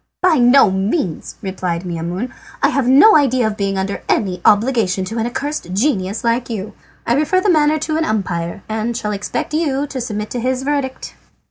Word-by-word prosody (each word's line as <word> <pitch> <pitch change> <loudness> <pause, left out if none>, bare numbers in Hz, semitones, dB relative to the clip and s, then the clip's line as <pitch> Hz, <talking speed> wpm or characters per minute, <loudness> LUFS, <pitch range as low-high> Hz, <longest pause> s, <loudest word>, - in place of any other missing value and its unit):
"By 355 -4 +4
no 245 -3 +6
means," 190 - -2
replied 185 -3 -3
Maimoune. 175 +7 -4 0.3
"I - - +5
have 275 -3 0
no 280 +13 +7
idea 260 -5 +3
of 220 -1 -1
being 195 -1 -2
under 195 +1 -3
any 185 -5 0
obligation 210 -4 +2
to 225 +4 -4
an 225 - 0
accursed 270 - -4
genius 200 -3 0
like 235 +1 0
you. 210 -3 -5 0.3
I 235 - +2
refer 305 +7 +2
the 380 +1 +2
matter 305 -1 +3
to 310 +1 -2
an 320 - 0
umpire, 185 - -2
and 220 +2 -2
shall 210 -3 -3
expect 205 +8 -4
you 290 -3 0
to 265 -3 -5
submit 210 -2 -4
to 245 - -3
his 255 +2 -1
verdict." 275 -2 -3
230 Hz, 190 wpm, -18 LUFS, 195-275 Hz, 0.3 s, no